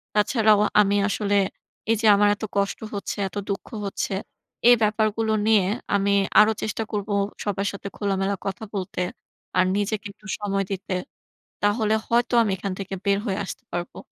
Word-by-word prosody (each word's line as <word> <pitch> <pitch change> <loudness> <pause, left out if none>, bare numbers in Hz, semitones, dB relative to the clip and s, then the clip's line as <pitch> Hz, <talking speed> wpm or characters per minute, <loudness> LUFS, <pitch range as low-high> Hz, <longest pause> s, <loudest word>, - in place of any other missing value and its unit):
তাছাড়াও 215 -1 +4 0.2
আমি 200 0 +2
আসলে 205 0 0 0.6
এই - - +4
যে 225 - +3
আমার 205 +1 +4
এত 210 - -11
কষ্ট 200 0 0 0.2
হচ্ছে, 200 - -4
এত 190 - -12
দুঃখ 195 - -3 0.2
হচ্ছে 195 - -2 0.6
এই 245 - +9
ব্যাপারগুলো 215 +1 +1
নিয়ে 215 -4 +5 0.3
আমি 200 0 +2 0.3
আরো 215 - +7
চেষ্টা 220 +1 -2
করব 205 -1 -3 0.3
সবার 200 -1 -1
সাথে 200 0 -7
খোলামেলা 195 -1 0
কথা 195 +2 -4
বলতে। 185 -2 -3 0.6
আর 185 - +5
নিজেকে 210 +2 -1
একটু 215 +1 -16
সময় 195 -1 0
দিতে। 195 0 -3 0.7
তাহলে 215 +1 +2
হয়তো 240 +1 +2
আমি 215 - 0
এখান 195 0 -4
থেকে 195 -1 -5
বের 200 0 +3
হয়ে 195 -2 -1
আসতে - - -8
পারবো। 175 0 -4
205 Hz, 160 wpm, -24 LUFS, 195-215 Hz, 0.7 s, এই